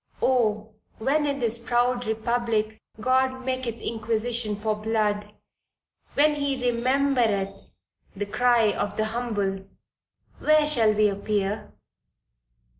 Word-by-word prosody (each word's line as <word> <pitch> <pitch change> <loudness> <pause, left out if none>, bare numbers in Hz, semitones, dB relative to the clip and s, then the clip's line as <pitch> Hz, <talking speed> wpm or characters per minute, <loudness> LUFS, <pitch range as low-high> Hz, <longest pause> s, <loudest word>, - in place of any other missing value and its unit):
Oh 220 -4 +1 0.2
when 290 +6 +1
in 280 -1 -1
this 235 -3 -1
proud 245 0 0
republic 220 -1 -1 0.2
God 260 +2 +1
maketh 255 -3 -3
inquisition 225 0 -1
for 215 +1 -1
blood, 210 -1 -1 0.8
when 300 +1 +4
he 280 -2 -1
remembereth 235 -6 0 0.5
the 205 +1 -3
cry 235 0 +3
of 205 0 -3
the 215 - +1
humble 200 -5 -2 0.7
where 305 0 +4
shall 235 -8 +3
we 215 0 +4
appear? 205 +1 -2
230 Hz, 110 wpm, -25 LUFS, 210-255 Hz, 0.8 s, when